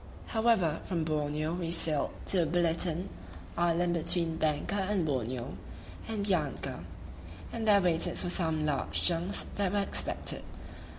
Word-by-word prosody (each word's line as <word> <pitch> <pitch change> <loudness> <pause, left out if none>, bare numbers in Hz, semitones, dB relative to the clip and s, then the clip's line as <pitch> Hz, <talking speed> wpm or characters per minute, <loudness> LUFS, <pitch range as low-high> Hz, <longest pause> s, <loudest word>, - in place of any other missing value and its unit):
However, 220 -9 +2
from 170 -4 -1
Borneo 155 0 -1
we 175 -1 -2
sailed 160 -3 +2 0.2
to 175 -4 +2
Biliton 170 +2 0 0.5
[island 175 0 +2
between 170 0 0
Banka 155 +2 0
and 195 -2 +1
Borneo] 130 -3 -2 0.5
and 215 -3 -2
Bianca, 160 -9 -1 0.7
and 225 -1 -2
there 200 -1 +7
waited 170 -2 +1
for - - -3
some 160 -4 +1
large 145 -3 0
junks 175 +3 +1
that 200 -3 +1
were 205 - 0
expected. - - +1
170 Hz, 130 wpm, -31 LUFS, 155-185 Hz, 0.7 s, there